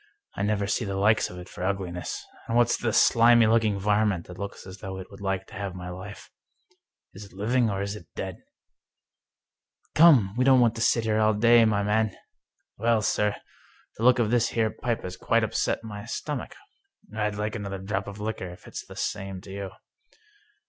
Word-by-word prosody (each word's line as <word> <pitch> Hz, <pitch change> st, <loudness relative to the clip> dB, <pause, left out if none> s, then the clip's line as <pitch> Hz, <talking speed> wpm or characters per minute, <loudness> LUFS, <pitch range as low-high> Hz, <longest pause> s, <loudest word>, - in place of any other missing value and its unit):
I -, -, -5 dB
never 100 Hz, 0 st, 0 dB
see 115 Hz, +4 st, -1 dB
the 100 Hz, -2 st, -3 dB
like 105 Hz, +3 st, +3 dB
of 90 Hz, -, -10 dB
it 90 Hz, -, -9 dB
for 90 Hz, -, -8 dB
ugliness. 95 Hz, -2 st, -3 dB, 0.2 s
And 115 Hz, -, 0 dB
what's 120 Hz, 0 st, +4 dB
the 115 Hz, -, -1 dB
slimy 115 Hz, +1 st, +5 dB
looking 110 Hz, -2 st, +2 dB
varmint 105 Hz, -3 st, +1 dB
that 90 Hz, 0 st, -11 dB
looks 100 Hz, 0 st, -6 dB
as 95 Hz, 0 st, -10 dB
though 95 Hz, 0 st, -6 dB
it 95 Hz, +1 st, -9 dB
would 100 Hz, -, -12 dB
like 95 Hz, -1 st, -2 dB
to -, -, -17 dB
have 95 Hz, -1 st, -5 dB
my 90 Hz, 0 st, -7 dB
life? 95 Hz, +3 st, -10 dB, 0.8 s
Is 95 Hz, -, -10 dB
it 100 Hz, -, -17 dB
living, 115 Hz, +4 st, +1 dB
or 100 Hz, -1 st, -2 dB
is 100 Hz, +1 st, -4 dB
it 85 Hz, -7 st, -11 dB
dead? -, -, -5 dB, 0.5 s
" -, -, -63 dB
" -, -, -45 dB
Come, 135 Hz, -, +6 dB
we 125 Hz, -, +2 dB
don't 130 Hz, -1 st, +6 dB
want 120 Hz, -3 st, +4 dB
to 115 Hz, -, -6 dB
sit 115 Hz, 0 st, +3 dB
here 110 Hz, -1 st, +1 dB
all 110 Hz, 0 st, +3 dB
day, 115 Hz, +2 st, +6 dB
my 105 Hz, -2 st, +1 dB
man! 110 Hz, 0 st, +1 dB, 0.2 s
" -, -, -62 dB
" -, -, -57 dB
Well, 115 Hz, -1 st, +2 dB
sir, 105 Hz, -1 st, +1 dB, 0.6 s
the 110 Hz, -, -5 dB
look 125 Hz, +1 st, +6 dB
of 115 Hz, -3 st, +1 dB
this 120 Hz, 0 st, +3 dB
here 110 Hz, -2 st, 0 dB
pipe 120 Hz, -2 st, -3 dB
has 90 Hz, 0 st, -5 dB
quite 115 Hz, +4 st, +1 dB
upset 110 Hz, -, -1 dB
my 105 Hz, -2 st, -7 dB
stomach. -, -, -5 dB, 0.6 s
I'd 105 Hz, -1 st, -1 dB
like 105 Hz, +1 st, -3 dB
another 100 Hz, -2 st, -4 dB
drop 95 Hz, +1 st, -3 dB
of 100 Hz, 0 st, -8 dB
liquor, 105 Hz, -3 st, -4 dB
if 90 Hz, -, -13 dB
it's -, -, -7 dB
the -, -, -13 dB
same 95 Hz, -2 st, -4 dB
to 95 Hz, -, -12 dB
you." 100 Hz, 0 st, -5 dB
105 Hz, 210 wpm, -26 LUFS, 95-115 Hz, 0.8 s, Come